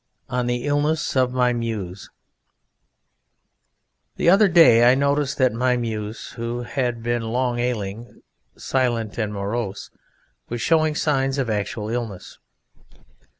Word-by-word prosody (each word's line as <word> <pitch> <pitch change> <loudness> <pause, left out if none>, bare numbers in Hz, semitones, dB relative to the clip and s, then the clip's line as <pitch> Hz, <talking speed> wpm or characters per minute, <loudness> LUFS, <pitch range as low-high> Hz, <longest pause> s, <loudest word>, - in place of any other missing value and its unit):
ONE 125 -1 -1
THE 120 +1 -2
ILLNESS 145 +2 0
OF 130 -1 +2
MY 125 -1 +2
MUSE 105 -6 -5 2.1
The 170 - +3
other 200 +2 +6
day 125 -10 +6
I - - +4
noticed 140 0 0
that 130 -3 +3
my 125 +2 +1
Muse, 110 -2 -4
who 120 +1 -5
had 120 -3 -3
long 120 +1 -1
been 120 - 0
ailing, 115 -1 -5 0.4
silent 120 -5 -1
and 105 -2 -1
morose, 100 0 -4 0.6
was 120 - -4
showing 155 +3 +2
signs 135 -3 0
of 130 -5 -1
actual 105 +1 -3
illness. 115 -6 -5
120 Hz, 125 wpm, -22 LUFS, 115-135 Hz, 2.1 s, other